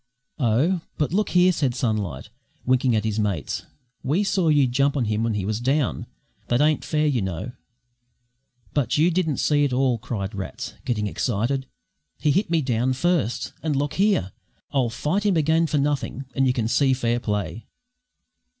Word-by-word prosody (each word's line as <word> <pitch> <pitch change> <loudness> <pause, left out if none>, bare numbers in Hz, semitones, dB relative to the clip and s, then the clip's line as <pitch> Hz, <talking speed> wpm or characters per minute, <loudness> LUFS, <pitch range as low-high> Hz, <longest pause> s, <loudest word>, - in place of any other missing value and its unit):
"Oh, 140 - +2 0.2
But 150 +2 -1
look 210 +2 +1
here," 180 +1 +5
said 140 -8 0
Sunlight, 105 - -2 0.3
winking 125 -1 +2
at 105 - +1
his 110 0 -1
mates, 100 -8 -2 0.3
"we 155 +10 +1
saw 195 -4 +1
you 145 -3 +5
jump 140 +3 +1
on 125 - +1
him 105 0 0
when 115 -2 0
he 100 -2 -2
was 110 +2 -1
down. 135 +3 0 0.4
That 120 - +1
ain't 150 +1 +2
fair, 155 -1 0
you 135 -6 +1
know." 95 +5 -4 1.2
"But 140 -4 +1
you 165 +4 +4
didn't 160 -5 0
see 145 -1 +2
it 140 - +1
all," 125 -2 +1
cried 100 -2 -4
Rats, 95 -2 -6
getting 105 -4 -1
excited. 120 +5 -1 0.5
"He 150 - +1
hit 195 +6 +1
me 165 -2 +2
down 125 0 +1
first! 135 - 0
And 155 -3 -1
look 145 +1 -1
here, 195 - +2 0.4
I'll 130 -4 +1
fight 150 - -1
him 200 -5 +2
again 160 +2 +3
for 155 - 0
nothing, 140 -1 -1
and 135 0 +2
you 125 - +3
can 115 -3 -1
see 135 +3 +3
fair 120 -2 0
play." 105 -3 -3
130 Hz, 175 wpm, -24 LUFS, 115-155 Hz, 1.2 s, here